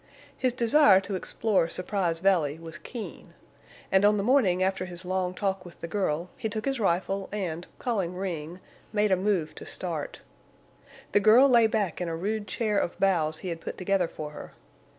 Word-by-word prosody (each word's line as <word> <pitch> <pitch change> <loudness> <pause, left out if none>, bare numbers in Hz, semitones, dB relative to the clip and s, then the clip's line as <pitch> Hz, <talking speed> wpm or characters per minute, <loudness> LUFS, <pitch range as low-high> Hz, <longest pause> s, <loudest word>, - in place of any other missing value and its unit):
His 255 -1 +1
desire 235 -4 +5
to 200 +1 -6
explore 190 -1 0
Surprise 180 -3 -2
Valley 170 -6 +2
was 165 0 -9
keen, 235 -4 -9 0.6
and 190 +1 +4
on 210 +1 +5
the 200 - 0
morning 205 -7 +3
after 190 -1 0
his 180 0 -9
long 185 0 -1
talk 195 -1 -1
with 175 -2 -13
the - - -5
girl 175 -3 -1
he 225 -3 -3
took 215 +1 -4
his 270 -2 -1
rifle 195 0 0
and, 180 -4 -4
calling 195 -8 -2
Ring, 175 -2 -4 0.3
made 210 -1 +2
a - - +6
move 185 -5 0
to - - -10
start. 165 -5 -5 0.9
The - - +4
girl 225 +6 +7
lay 235 -4 +5
back 205 -6 -1
in 175 - -2
a 165 - -2
rude 205 +5 -2
chair 210 +1 0
of 175 - -3
boughs 160 -5 +1
he - - -2
had 165 -1 -5
put - - -6
together 185 -1 +1
for 155 -2 -7
her. - - -10
190 Hz, 190 wpm, -27 LUFS, 170-210 Hz, 0.9 s, girl